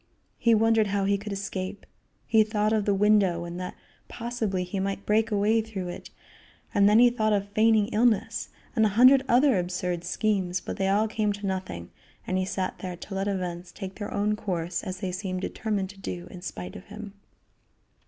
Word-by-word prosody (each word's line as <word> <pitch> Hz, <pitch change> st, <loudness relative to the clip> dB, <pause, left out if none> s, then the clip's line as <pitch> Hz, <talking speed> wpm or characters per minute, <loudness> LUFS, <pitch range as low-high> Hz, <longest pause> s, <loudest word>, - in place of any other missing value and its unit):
He 230 Hz, -1 st, +4 dB
wondered 225 Hz, 0 st, +3 dB
how 200 Hz, 0 st, 0 dB
he 200 Hz, +1 st, +3 dB
could 205 Hz, +1 st, -5 dB
escape. 195 Hz, 0 st, -4 dB, 0.4 s
He 225 Hz, -1 st, +4 dB
thought 215 Hz, 0 st, 0 dB
of 215 Hz, -2 st, +1 dB
the 205 Hz, -, +3 dB
window, 195 Hz, -4 st, +3 dB
and 175 Hz, +1 st, -6 dB
that 180 Hz, 0 st, -5 dB, 0.3 s
possibly 230 Hz, -6 st, -2 dB
he 180 Hz, +2 st, -4 dB
might 195 Hz, +1 st, -3 dB
break 220 Hz, +1 st, +2 dB
away 215 Hz, +2 st, +2 dB
through 200 Hz, -5 st, -5 dB
it, 175 Hz, -, -8 dB, 0.6 s
and 200 Hz, 0 st, +5 dB
then 210 Hz, -, +5 dB
he 240 Hz, +1 st, +7 dB
thought 215 Hz, -3 st, +1 dB
of 200 Hz, 0 st, 0 dB
feigning 215 Hz, 0 st, +4 dB
illness, 225 Hz, -1 st, +1 dB, 0.3 s
and 220 Hz, -, +4 dB
a 215 Hz, -, +4 dB
hundred 260 Hz, +2 st, +7 dB
other 250 Hz, -3 st, +5 dB
absurd 180 Hz, -1 st, -2 dB
schemes, 185 Hz, -1 st, 0 dB
but -, -, -6 dB
they 195 Hz, -1 st, +1 dB
all 210 Hz, +3 st, +3 dB
came 215 Hz, -1 st, 0 dB
to 205 Hz, 0 st, -7 dB
nothing, 185 Hz, -, -4 dB, 0.3 s
and 185 Hz, 0 st, 0 dB
he 185 Hz, -, 0 dB
sat 185 Hz, 0 st, -3 dB
there 180 Hz, -2 st, -5 dB
to 195 Hz, -, -9 dB
let 195 Hz, +1 st, -1 dB
events 180 Hz, -3 st, -3 dB
take 190 Hz, -2 st, -7 dB
their 205 Hz, -, -4 dB
own 210 Hz, +1 st, +1 dB
course 175 Hz, -5 st, -3 dB
as 185 Hz, 0 st, -6 dB
they 185 Hz, -, -2 dB
seemed 185 Hz, 0 st, -3 dB
determined 205 Hz, -2 st, -2 dB
to 200 Hz, -, -17 dB
do 180 Hz, -2 st, -6 dB
in 180 Hz, -, -9 dB
spite 90 Hz, -, -6 dB
of 185 Hz, -, -10 dB
him. 210 Hz, -1 st, -9 dB
200 Hz, 200 wpm, -27 LUFS, 185-215 Hz, 0.6 s, he